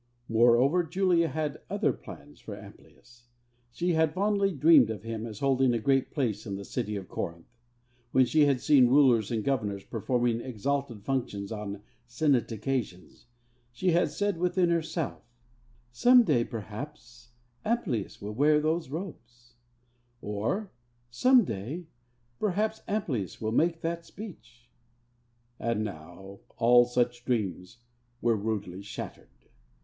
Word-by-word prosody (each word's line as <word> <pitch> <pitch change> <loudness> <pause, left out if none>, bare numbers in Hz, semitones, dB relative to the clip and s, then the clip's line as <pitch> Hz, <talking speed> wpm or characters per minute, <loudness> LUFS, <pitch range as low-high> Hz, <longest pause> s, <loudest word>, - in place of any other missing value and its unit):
Moreover, 120 +9 +4
Julia 175 0 +2
had 155 -2 -3
other - - +1
plans 75 +1 -12
for - - -8
Amplius. 120 0 -16 0.4
She 175 +7 -1
had 160 0 +2
fondly 200 0 +2
dreamed 150 - +6
of 105 -4 -5
him 115 0 -4
as 110 -2 -9
holding 135 -2 +3
a - - 0
great 135 +3 +2
place 115 -8 -2
in 100 - -3
the 100 0 -7
city 105 +2 -3
of 95 -2 -6
Corinth. 85 0 -5 0.7
When 130 0 +5
she 150 +4 +4
had 135 -3 +1
seen 135 -3 +5
rulers 125 -5 +4
and 115 -3 -1
governors 105 -7 -1
performing 120 +2 -1
exalted 130 -1 -3
functions 105 -6 -3
on 105 -2 -5 0.2
State 120 -2 +1
occasions, 115 -3 -4 0.4
she 180 +9 0
had 175 +2 +3
said 205 -3 -1
within 180 0 +2
herself, 165 -1 -2 0.7
'Some 245 - +6
day, 130 - +2
perhaps, 120 +2 -9 0.3
Amplius 215 - -2
will 105 +1 -6
wear 150 +5 +4
those 160 -1 -1
robes,' 120 -8 -8 0.7
or 110 - -3 0.4
'Some 250 - +5
day, 125 - -5 0.5
perhaps, 215 +2 0
Amplius 140 - -2
will 110 0 -2
make 165 +7 +1
that 170 0 -3
speech.' 125 - -12 0.9
And 115 -2 -1
now 95 +1 -9 0.2
all 120 +1 +6
such 120 0 -1
dreams 100 -5 -2 0.4
were 115 -1 +2
rudely 100 -3 -3
shattered. 100 - -8
120 Hz, 135 wpm, -28 LUFS, 110-160 Hz, 0.9 s, dreamed